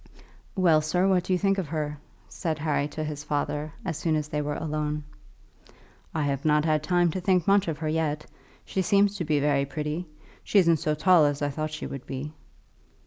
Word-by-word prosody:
"Well, 170 Hz, -5 st, +4 dB
sir, 180 Hz, +5 st, +1 dB
what 185 Hz, -2 st, +2 dB
do -, -, -3 dB
you -, -, +3 dB
think 195 Hz, +1 st, +1 dB
of 180 Hz, -, -3 dB
her?" 150 Hz, -1 st, -3 dB, 0.3 s
said 160 Hz, -4 st, -3 dB
Harry 150 Hz, -2 st, 0 dB
to 155 Hz, +1 st, -5 dB
his 150 Hz, -1 st, -5 dB
father, 150 Hz, +1 st, -2 dB
as 165 Hz, -5 st, -2 dB
soon 160 Hz, -1 st, +1 dB
as 150 Hz, -1 st, -2 dB
they 150 Hz, 0 st, -1 dB
were 145 Hz, 0 st, -2 dB
alone. 150 Hz, -1 st, -2 dB, 1.1 s
"I 155 Hz, -, -1 dB
have 140 Hz, -1 st, -1 dB
not 150 Hz, 0 st, +3 dB
had 155 Hz, -2 st, +2 dB
time 175 Hz, +1 st, +2 dB
to 185 Hz, -, -3 dB
think 180 Hz, -2 st, +2 dB
much 200 Hz, -1 st, +4 dB
of 160 Hz, -3 st, -2 dB
her 155 Hz, -, -3 dB
yet. 155 Hz, -1 st, -1 dB, 0.4 s
She 190 Hz, -, -1 dB
seems 200 Hz, +1 st, +3 dB
to 180 Hz, -, -2 dB
be 150 Hz, -2 st, +1 dB
very 140 Hz, -1 st, +2 dB
pretty. 150 Hz, +4 st, -4 dB, 0.4 s
She -, -, +1 dB
isn't 170 Hz, -4 st, +5 dB
so 150 Hz, 0 st, -1 dB
tall 165 Hz, 0 st, +5 dB
as 145 Hz, 0 st, 0 dB
I 145 Hz, -, 0 dB
thought 155 Hz, +2 st, -3 dB
she 155 Hz, 0 st, -6 dB
would 135 Hz, -2 st, -7 dB
be." 135 Hz, +3 st, -5 dB
155 Hz, 210 wpm, -26 LUFS, 150-175 Hz, 1.1 s, isn't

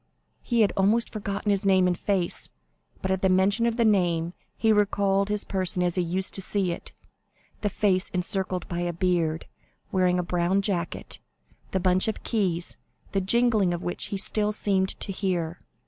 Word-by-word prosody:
He 235 Hz, -2 st, +1 dB
had 210 Hz, -, +3 dB
almost 210 Hz, +4 st, +2 dB
forgotten 205 Hz, -1 st, -2 dB
his 200 Hz, 0 st, +1 dB
name 190 Hz, -2 st, +4 dB
and 180 Hz, -1 st, +2 dB
face, 185 Hz, -2 st, -1 dB, 0.5 s
but 190 Hz, -, 0 dB
at 190 Hz, 0 st, 0 dB
the 190 Hz, -, +3 dB
mention 200 Hz, +5 st, +3 dB
of 230 Hz, 0 st, -1 dB
the 235 Hz, -, +3 dB
name 175 Hz, -5 st, +2 dB, 0.2 s
he 220 Hz, -1 st, +3 dB
recalled 200 Hz, -1 st, +2 dB
his 210 Hz, 0 st, -1 dB
person 185 Hz, -2 st, 0 dB
as 175 Hz, -1 st, +1 dB
he 180 Hz, -, +1 dB
used 180 Hz, +2 st, -2 dB
to 195 Hz, -, +2 dB
see 190 Hz, -1 st, 0 dB
it, 170 Hz, -, -7 dB, 0.7 s
the 205 Hz, -, +1 dB
face 190 Hz, -2 st, +1 dB
encircled 185 Hz, 0 st, -2 dB
by 175 Hz, -, -3 dB
a 175 Hz, 0 st, -1 dB
beard, 170 Hz, -2 st, 0 dB, 0.5 s
wearing 180 Hz, -1 st, +2 dB
the 180 Hz, -, 0 dB
brown 175 Hz, +3 st, +1 dB
jacket, 180 Hz, -4 st, -3 dB, 0.5 s
the 190 Hz, -, -1 dB
bunch 185 Hz, +2 st, +2 dB
of 220 Hz, -, -3 dB
keys, 180 Hz, -7 st, 0 dB, 0.3 s
the 195 Hz, -, 0 dB
jingling 210 Hz, -3 st, +3 dB
of 170 Hz, -, -7 dB
which 175 Hz, -, -3 dB
he 200 Hz, -, -4 dB
still 210 Hz, +2 st, +2 dB
seemed 195 Hz, -2 st, +1 dB
to -, -, 0 dB
hear. 180 Hz, -4 st, -2 dB
190 Hz, 180 wpm, -26 LUFS, 180-205 Hz, 0.7 s, name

